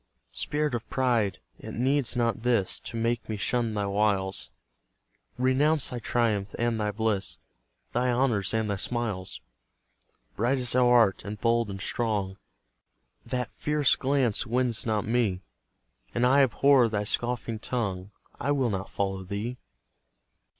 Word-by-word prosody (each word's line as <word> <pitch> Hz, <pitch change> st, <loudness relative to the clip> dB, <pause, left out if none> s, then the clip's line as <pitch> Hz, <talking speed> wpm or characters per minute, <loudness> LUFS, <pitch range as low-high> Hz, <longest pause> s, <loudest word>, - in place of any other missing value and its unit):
Spirit 150 Hz, -1 st, -1 dB
of 120 Hz, -1 st, -4 dB
Pride, 120 Hz, -7 st, +1 dB, 0.2 s
it -, -, -8 dB
needs 130 Hz, +1 st, +1 dB
not 115 Hz, -1 st, +1 dB
this 115 Hz, -5 st, +1 dB
To 115 Hz, -, -7 dB
make 115 Hz, +1 st, -1 dB
me 110 Hz, -, -2 dB
shun 115 Hz, +1 st, 0 dB
thy 100 Hz, -1 st, 0 dB
wiles, 100 Hz, -1 st, 0 dB, 0.9 s
Renounce 135 Hz, +4 st, +3 dB
thy 125 Hz, -, -3 dB
triumph 110 Hz, -4 st, 0 dB
and 115 Hz, -2 st, 0 dB
thy 105 Hz, -, 0 dB
bliss, 105 Hz, -2 st, -1 dB, 0.6 s
Thy 125 Hz, +1 st, +1 dB
honours 120 Hz, -6 st, +1 dB
and 110 Hz, -2 st, 0 dB
thy 100 Hz, -, -1 dB
smiles! 105 Hz, -4 st, -3 dB, 0.9 s
Bright 120 Hz, +5 st, +1 dB
as 125 Hz, -1 st, +1 dB
thou 125 Hz, -1 st, +4 dB
art, 115 Hz, -5 st, +4 dB
and 105 Hz, +1 st, -6 dB
bold, 115 Hz, -1 st, +2 dB
and 95 Hz, 0 st, -6 dB
strong, 100 Hz, -3 st, -1 dB, 0.9 s
That 125 Hz, -2 st, -2 dB
fierce 150 Hz, -2 st, +2 dB
glance 130 Hz, -5 st, +1 dB
wins 120 Hz, -1 st, 0 dB
not 105 Hz, -2 st, 0 dB
me, 110 Hz, -6 st, 0 dB, 0.7 s
And 125 Hz, -, +2 dB
I 135 Hz, +3 st, +5 dB
abhor 135 Hz, -1 st, +4 dB
thy 105 Hz, -1 st, -1 dB
scoffing 115 Hz, 0 st, -2 dB
tongue 100 Hz, -6 st, -3 dB, 0.3 s
I 145 Hz, +3 st, +1 dB
will 130 Hz, -5 st, +1 dB
not 95 Hz, -1 st, -3 dB
follow 95 Hz, -1 st, -2 dB
thee! 105 Hz, +6 st, -4 dB
115 Hz, 145 wpm, -27 LUFS, 105-125 Hz, 0.9 s, I